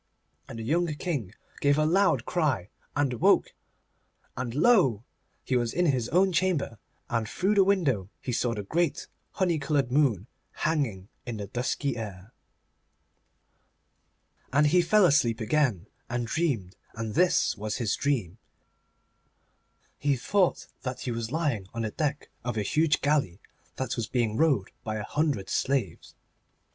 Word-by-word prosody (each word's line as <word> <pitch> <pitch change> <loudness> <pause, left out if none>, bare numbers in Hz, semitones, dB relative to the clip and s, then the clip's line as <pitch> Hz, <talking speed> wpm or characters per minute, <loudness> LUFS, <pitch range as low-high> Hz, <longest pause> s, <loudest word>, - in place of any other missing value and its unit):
And - - -7
the 115 - -5
young 170 +9 +1
King 135 - -3 0.2
gave 145 0 +3
a 155 - +3
loud 195 +5 +3
cry 140 - 0 0.3
and 145 -3 +1
woke, - - +4 0.8
and 120 -1 -4
lo! 145 - +4 0.4
he 130 - -1
was 120 -2 0
in 180 - +2
his 130 -7 +1
own 190 +3 +3
chamber, 170 - 0 0.3
and 115 -3 -1
through 195 +3 +1
the 200 -2 +5
window 150 - +1
he 125 - -4
saw 120 0 0
the 105 - -4
great 165 - -1 0.3
honey 175 -4 +1
coloured 140 -3 0
moon 125 - +2 0.4
hanging 125 - -1 0.2
in 120 -2 -4
the 100 - -4
dusky 125 +4 -2
air. 100 -1 -7 2.2
And 140 +3 +4
he 175 +5 +4
fell 205 +3 +4
asleep 125 -8 +3
again 115 - +1 0.2
and 120 0 -1
dreamed, 115 - -1 0.2
and 115 -1 -4
this 180 +3 +3
was 105 0 -4
his 115 -4 0
dream. 115 -9 -1 1.6
He 140 -1 +2
thought 185 +9 +1 0.2
that 130 -1 -5
he 125 - -3
was 115 0 -4
lying 145 - -1
on 115 - -2
the 110 - -2
deck 150 +1 -2
of 120 -2 -3
a 105 - +1
huge 155 +7 +2
galley 140 - +1 0.4
that 130 -2 -3
was 115 -3 -2
being 115 -4 0
rowed 135 -9 +2
by 110 -1 -3
a 105 - -3
hundred 145 -8 -1
slaves. 130 -9 -1
130 Hz, 150 wpm, -27 LUFS, 110-155 Hz, 2.2 s, the